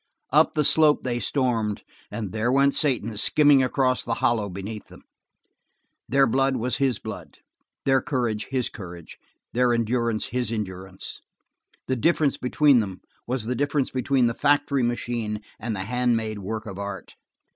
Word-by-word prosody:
Up 155 +2 +4
the 150 - +2
slope 155 0 +5
they 120 -2 -1
stormed 115 -6 -1 0.3
and 105 -5 -5
there 110 +2 0
went 140 +1 +4
Satan 120 -7 +1
skimming 145 +4 +5
across 130 0 +1
the 115 - -2
hollow 110 -4 +1
beneath 100 +4 -7
them. - - -15 1.1
Their 135 +1 +4
blood 135 +2 +1
was 125 +1 -1
his 135 -3 +1
blood, - - -9 0.5
their 135 -1 +3
courage 120 -6 -2
his 130 -2 0
courage, 85 -4 -10 0.3
their 125 0 +3
endurance 115 -1 0
his 125 0 -1
endurance. 95 -3 -6 0.6
The 130 - -1
difference 155 +1 +2
between 135 +1 +3
them 95 -4 -4 0.3
was 125 -2 -2
the 125 - -1
difference 145 +1 0
between 130 0 +1
the 115 - +1
factory 145 0 +2
machine 120 -2 -2 0.2
and 110 0 -3
the 95 - -3
hand 125 +2 +1
made 110 -2 -4
work 110 +3 -5
of 100 -3 -7
art. 100 -2 -6
120 Hz, 155 wpm, -24 LUFS, 110-135 Hz, 1.1 s, slope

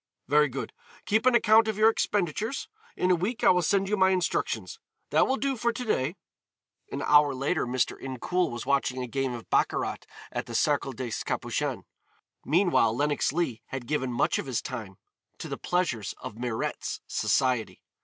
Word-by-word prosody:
Very 150 +2 +4
good, 135 +2 -5 0.3
keep 220 +4 +2
an 255 - +5
account 220 -1 +5
of 215 -2 -1
your 220 +1 +6
expenditures. 210 - -1 0.3
In 185 - +2
a - - +5
week 215 +8 -3
I 235 - +7
will 180 -1 +3
send 195 +4 +1
you 210 - +1
my 190 -2 +4
instructions. 185 -2 -1 0.3
That - - +4
will 265 - +2
do 275 0 0
for 235 0 0
to 250 +2 -5
day." 160 - 0 0.8
An - - -3
hour 145 -2 +5
later 140 +3 0
Mr. 125 0 0
Incoul 135 +8 -1
was 120 +1 -6
watching 130 -2 0
a - - -4
game 135 +1 -2
of 115 -2 -8
baccarat - - +1 0.3
at - - -4
the - - -6
Cercle 135 - +1
des 125 -1 -5
Capucines. - - -2 0.6
Meanwhile 160 - +3
Lenox 145 +1 +1
Leigh 150 -7 -1
had 135 -2 -6
given 130 -2 -1
much 120 - +1
of - - -5
his 125 -3 0
time 110 -7 -7 0.4
to - - -6
the - - -4
pleasures 155 - -1
of - - -7
Mirette's 120 -1 -3
society. 125 -4 0
150 Hz, 180 wpm, -27 LUFS, 130-200 Hz, 0.8 s, I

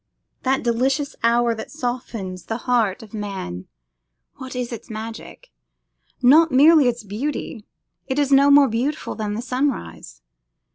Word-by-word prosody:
That 265 +1 0
delicious 265 +5 0
hour 235 0 +3
that 220 -1 -7
softens 235 - -5
the 225 - -3
heart 230 -6 +1
of 220 - -15
man, 190 - -6 0.7
what 260 -1 -8
is 250 -1 -3
its 230 - -9
magic? 220 - -8 0.7
Not 315 +6 +6
merely 295 +2 +6
its 240 -1 -1
beauty; 220 +1 -5 0.4
it 265 - -2
is 285 -1 +1
not 280 +1 +6
more 285 -1 +7
beautiful 260 +7 -2
than 210 -2 -4
the 230 - -4
sunrise. 235 - -3
240 Hz, 140 wpm, -22 LUFS, 215-270 Hz, 0.7 s, more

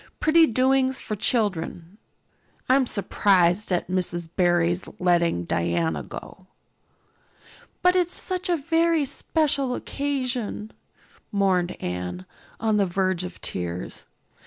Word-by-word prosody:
Pretty 320 +1 +5
doings 260 +2 +2
for 215 - -4
children. 195 -4 -1 0.7
I'm 260 0 +4
surprised 195 -2 +2
at 180 - 0
Mrs. 175 -2 -2
Barry's 175 -1 +2
letting 170 - +2
Diana 85 -3 0
go." 185 - -10 1.4
"But 360 0 +5
it's 355 -1 +1
such 365 -1 -3
a 345 - +3
very 330 0 +2
special 275 -3 0
occasion," 255 -6 -3 0.6
mourned 185 -3 +1
Anne, 90 0 -4 0.3
on 220 -1 +1
the 200 -2 +2
verge 185 0 0
of 180 -1 -8
tears. 90 0 -5
200 Hz, 110 wpm, -25 LUFS, 175-265 Hz, 1.4 s, Pretty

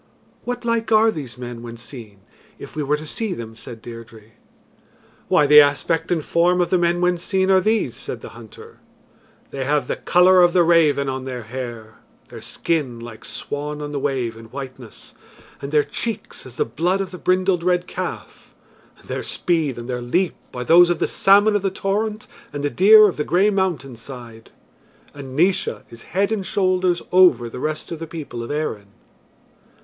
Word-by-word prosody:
"What 245 0 -4
like 230 -1 -1
are 220 +1 +5
these 140 - -7
men 120 -1 -7
when 120 0 -9
seen, 115 -5 -10 0.4
if - - -11
we 155 - -2
were 145 +1 0
to 155 - -9
see 205 +4 -3
them?" 115 -1 -8
said 115 0 -11
Deirdre. 115 -2 -11 1.0
"Why, 150 - +4
the 150 +1 +9
aspect 155 +3 0
and 160 -4 0
form 175 +2 +2
of 175 - 0
the 185 - +3
men 175 0 +1
when 180 -1 +1
seen 190 +1 +1
are 190 -1 +5
these," 220 +3 0
said - - -6
the - - -9
hunter: 445 0 -14 0.7
"they 135 - -4
have 145 +2 0
the - - -1
colour 180 +1 +5
of 175 -1 +4
the 180 -2 +5
raven 160 -4 +3
on 130 0 -4
their 125 -2 -5
hair, 115 -2 -8 0.3
their - - -10
skin 145 -8 -2
like 115 -1 -10
swan 150 +1 -5
on 145 0 -5
the 145 - -3
wave 130 -5 -2
in 115 0 -12
whiteness, 130 -1 -10 0.5
and 140 0 -6
their 150 -1 +4
cheeks 210 - -5
as 120 - -13
the - - 0
blood 175 +11 -1
of 195 -1 -4
the 180 - -9
brindled 185 -1 +1
red 180 0 +1
calf, - - -7 0.4
and - - -21
their - - -3
speed 160 -7 -1
and 120 0 -7
their 125 -1 -3
leap 175 +10 0 0.2
are 125 - -3
those 175 +6 +6
of 175 - +1
the - - 0
salmon 205 +2 +4
of 205 - +1
the 195 - 0
torrent 210 +3 -2 0.3
and 145 0 -5
the 145 - 0
deer 215 +3 +7
of 190 - -3
the 150 - 0
grey 190 +7 +2
mountain 170 -10 -1
side. 115 -2 -11 0.6
And 135 -2 -9
Naois 180 +4 +1
is 115 - -11 0.2
head 200 +2 +2
and 215 -3 -1
shoulders 185 -2 0
over 175 -11 +5
the 115 - -8
rest 155 +4 -4
of 165 - -5
the 165 - -6
people 150 -7 -7
of 115 - -7
Erin." 145 -9 -3
155 Hz, 195 wpm, -21 LUFS, 125-185 Hz, 1.0 s, the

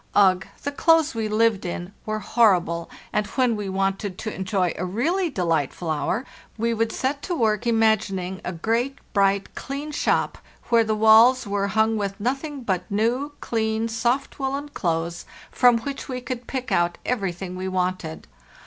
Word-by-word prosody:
Ugh, 190 -2 +4 0.2
the 285 - -1
clothes 320 +1 +3
we 225 -1 -2
lived 215 -1 +2
in 175 +1 -5
were 215 0 -1
horrible! 185 -6 +2 0.2
and 210 -1 +1
when 250 -3 +1
we 205 -2 -4
wanted 195 0 -1
to 215 - -4
enjoy 190 -2 0
a - - -4
really 315 - 0
delightful 165 - -1
hour 190 - -1 0.3
we 230 +1 +1
would 225 0 0
set 280 +2 -2
to 355 - -2
work 225 -3 +1
imagining 210 -5 +1
a - - -3
great, 230 +10 -1 0.2
bright, 195 -1 +2
clean 280 +3 -5
shop, 295 - 0 0.3
where 230 -1 +5
the 215 -1 0
walls 225 +4 +6
were 200 0 -1
hung 220 +2 +2
with 200 0 -3
nothing 275 +5 -2
but 185 -4 -2
new, 240 +8 0
clean, 220 0 0
soft 235 +6 -1
woollen 275 +2 -2
clothes, 170 - -2 0.3
from 245 -2 +5
which 275 +2 -6
we 255 -1 -3
could 250 -1 -6
pick 255 -1 -4
out 175 0 +2
everything 190 -6 -2
we 185 +1 -4
wanted. 185 -3 -2
220 Hz, 165 wpm, -24 LUFS, 190-250 Hz, 0.3 s, walls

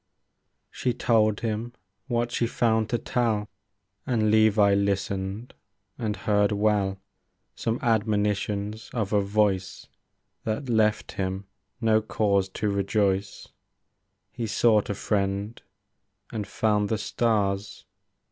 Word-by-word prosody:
She 125 -2 -1
told 110 -3 +2
him 115 +1 -3 0.3
what 120 -2 0
she 120 - 0
found 110 -2 +1
to 120 - +1
tell. 115 -4 0 0.6
And 110 -4 +2
Levi 110 -2 +5
listened, 100 +2 -1 0.5
and 110 -3 -1
heard 105 +1 +2
well 100 -2 +1 0.5
Some 115 0 -2
admonitions 105 -1 0
of 110 -3 -1
a 105 - +4
voice 100 -2 0 0.6
That 115 +5 -3
left 110 -2 +2
him 95 +1 -3 0.3
no 110 -2 +3
cause 100 -3 +1
to 105 +2 -2
rejoice. 100 0 0 0.4
— - - -51
He 115 -2 -4
sought 110 -1 +3
a 100 - -1
friend, 100 +2 -1 0.7
and 105 -3 -3
found 105 -1 +1
the 110 - +1
stars. 105 -3 -1
105 Hz, 115 wpm, -26 LUFS, 100-110 Hz, 0.7 s, Levi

